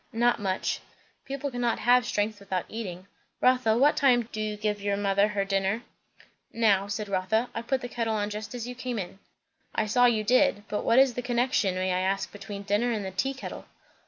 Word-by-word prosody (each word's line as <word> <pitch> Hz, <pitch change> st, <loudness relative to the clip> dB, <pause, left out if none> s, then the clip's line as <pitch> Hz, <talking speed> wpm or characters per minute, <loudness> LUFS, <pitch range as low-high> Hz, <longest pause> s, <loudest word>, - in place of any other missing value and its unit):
"Not 240 Hz, +1 st, +2 dB
much." 190 Hz, -2 st, -1 dB, 0.5 s
"People 275 Hz, +1 st, -4 dB
cannot 245 Hz, -1 st, 0 dB
have 245 Hz, 0 st, +4 dB
strength 210 Hz, 0 st, -1 dB
without 190 Hz, -2 st, -3 dB
eating. 185 Hz, -5 st, -6 dB, 0.3 s
Rotha, 250 Hz, -3 st, +3 dB
what 285 Hz, +4 st, +4 dB
time 245 Hz, -5 st, +3 dB
do 215 Hz, -, -4 dB
you 215 Hz, -1 st, -3 dB
give 210 Hz, -1 st, -2 dB
your 200 Hz, 0 st, 0 dB
mother 200 Hz, 0 st, +2 dB
her 205 Hz, -2 st, -1 dB
dinner?" 195 Hz, +3 st, 0 dB, 0.7 s
"Now," 200 Hz, -4 st, +2 dB
said 210 Hz, +1 st, -3 dB
Rotha. 200 Hz, +5 st, 0 dB
"I 230 Hz, -, -3 dB
put 260 Hz, +2 st, -1 dB
the 245 Hz, -, -4 dB
kettle 230 Hz, -2 st, -2 dB
on 205 Hz, 0 st, -1 dB
just 210 Hz, +3 st, -6 dB
as 240 Hz, -1 st, -5 dB
you 250 Hz, -, -5 dB
came 250 Hz, -1 st, -4 dB
in." 190 Hz, -1 st, -6 dB, 0.6 s
"I 220 Hz, -, +1 dB
saw 245 Hz, +4 st, +4 dB
you 220 Hz, -3 st, +2 dB
did. 255 Hz, -1 st, +3 dB
But 210 Hz, -, -2 dB
what 230 Hz, -, +3 dB
is 265 Hz, -1 st, +6 dB
the 245 Hz, -, -3 dB
connection, 245 Hz, -5 st, +1 dB
may 185 Hz, 0 st, 0 dB
I 180 Hz, -, +1 dB
ask, 195 Hz, +1 st, -1 dB
between 205 Hz, -1 st, -8 dB
dinner 210 Hz, +4 st, +1 dB
and 210 Hz, -4 st, -2 dB
the 190 Hz, -, -4 dB
tea 270 Hz, +9 st, -1 dB
kettle?" 265 Hz, -, -8 dB
215 Hz, 210 wpm, -27 LUFS, 200-245 Hz, 0.7 s, is